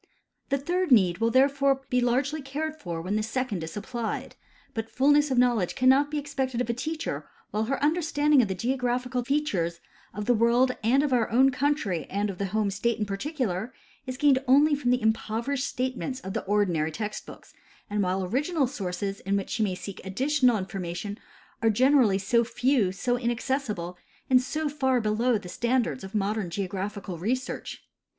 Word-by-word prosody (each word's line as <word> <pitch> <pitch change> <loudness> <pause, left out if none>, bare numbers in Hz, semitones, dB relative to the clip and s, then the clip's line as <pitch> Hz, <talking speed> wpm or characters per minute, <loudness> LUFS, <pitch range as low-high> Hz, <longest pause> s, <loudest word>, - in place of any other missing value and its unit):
The 275 - +2
third 350 +4 -1
need 185 -7 +5
will 225 0 +2
therefore 275 +1 +3
be 250 0 +3
largely 265 +5 +1
cared 300 +3 -4
for 170 - -5
when 195 +4 -1
the - - +1
second 220 -5 -2
is 160 - -6
supplied; 225 +2 -4 0.4
but 225 0 -4
fullness 290 +3 +3
of 260 - 0
knowledge 240 -7 +2
cannot 265 +3 +4
be 300 - -3
expected 270 -4 -2
of 245 -1 0
a - - -2
teacher 315 +6 -4 0.2
while 215 +1 0
her 270 +4 -1
under 320 +4 +2
standing 295 -3 +3
of 225 - 0
the 190 - -3
geographical 250 +2 -1
features 205 - -1 0.3
of 210 0 -5
the 245 - +4
world 240 +3 +3
and 260 +6 +4
of 285 -3 0
our 235 -3 +2
own 265 +4 +5
country 250 - -1
and 205 +1 -1
of 180 - -11
the 200 - -1
home 210 +1 0
state 225 +4 0
in 215 - -1
particular 220 - -3 0.3
is 255 0 -4
gained 275 -2 +4
only 290 +4 +5
from 280 -4 0
the 250 0 +3
impoverished 225 +5 0
statements 255 +1 -3
of 190 - -6
the - - -2
ordinary 185 -6 +1
text 210 +5 -5
books, - - -13 0.3
and 205 0 -1
while 185 0 0
the 185 - -3
original 295 - +1
sources 195 -5 -4
in 200 +1 0
which 195 - -4
she 230 - -1
may 195 -4 +1
seek 190 +1 -8
additional 255 +4 +2
information 190 +1 -5 0.4
are 225 - +4
generally 250 -2 +4
so 220 +5 +2
few, 240 -4 +1
so 245 +6 -1
inaccessible, 235 -7 -2 0.3
and 255 -1 +6
so 305 +4 -2
far 265 -3 +1
beloAV 220 +2 +1
the - - -8
standards 240 +5 0
of 190 +3 -8
modern 205 -2 -1
geographical 195 0 -4
research. 250 +7 -3
240 Hz, 185 wpm, -27 LUFS, 200-270 Hz, 0.4 s, and